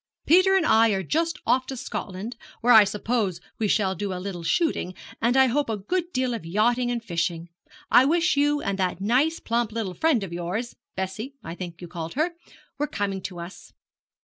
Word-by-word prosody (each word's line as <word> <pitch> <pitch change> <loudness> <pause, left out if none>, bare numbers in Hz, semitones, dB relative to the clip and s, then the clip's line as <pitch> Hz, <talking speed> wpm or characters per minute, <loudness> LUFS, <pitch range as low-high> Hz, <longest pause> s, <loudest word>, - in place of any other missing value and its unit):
Peter 370 +4 +5
and 375 -4 +3
I 225 -4 +5
are 190 -1 -1
just 325 - 0
off 255 0 +2
to 265 - -5
Scotland, 210 0 -5 0.3
where 245 +1 +5
I 215 -2 +9
suppose 210 -2 -1 0.2
we 220 - +1
shall 195 -2 +2
do 195 +2 -4
a - - -4
little 180 -1 -5
shooting, 185 - 0 0.3
and 240 +3 +2
I 265 - +7
hope 270 +1 0
a 220 - -1
good 350 - -2
deal 255 -3 0
of 230 - -5
yachting 235 +8 +1
and 240 -2 -2
fishing. 170 -3 -2 0.4
I 250 - +7
wish 340 +3 +2
you 290 +1 +2
and 195 0 -2
that 185 -2 0
nice 260 +11 +2
plump 230 -1 -1
little 215 -4 -3
friend 290 - +2
of 180 -3 -6
yours 180 +8 -3 0.2
Bessie, 195 +8 -4
I 165 - -6
think 175 -1 -8
you - - -6
called 165 +1 -6
her 315 +5 +1 0.5
were 295 - 0
coming 195 -5 -2
to 180 -2 -6
us. 170 +3 -10
225 Hz, 200 wpm, -25 LUFS, 190-265 Hz, 0.5 s, I